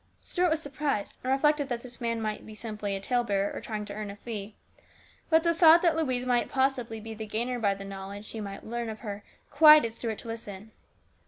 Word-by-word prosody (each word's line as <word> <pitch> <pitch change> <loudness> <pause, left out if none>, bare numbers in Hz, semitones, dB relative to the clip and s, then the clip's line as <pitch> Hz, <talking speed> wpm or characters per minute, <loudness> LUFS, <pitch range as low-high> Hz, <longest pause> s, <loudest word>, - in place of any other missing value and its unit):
Stuart 360 -1 0
was 315 0 +1
surprised, 285 -7 -3
and 255 - -1
reflected 290 +1 +2
that 240 -2 -2
this 245 -1 -11
man 230 -1 -1
might 215 -1 -3
be 215 - -11
simply 210 -3 -4
a - - -3
talebearer, 205 -3 0
or - - -5
trying 215 -2 -4
to 205 - -7
earn 210 0 -5
a 200 - -7
fee; 210 -1 -7 0.7
but 320 -1 +5
the 335 -1 +3
thought 335 0 +7
that 335 -2 +4
Louise 260 -6 0
might 245 -1 +1
possibly 260 -4 0
be 225 +1 -7
the 220 0 -7
gainer 240 +4 -2
by 200 -3 +2
knowledge 195 +1 -8
he 220 - -5
might 200 -1 -7
learn 235 0 -3
of 220 0 -7
her 205 -3 -6 0.3
quieted 300 -6 +7
Stuart 225 -2 -4
to - - -10
listen. 220 -2 -7
230 Hz, 215 wpm, -28 LUFS, 210-265 Hz, 0.7 s, thought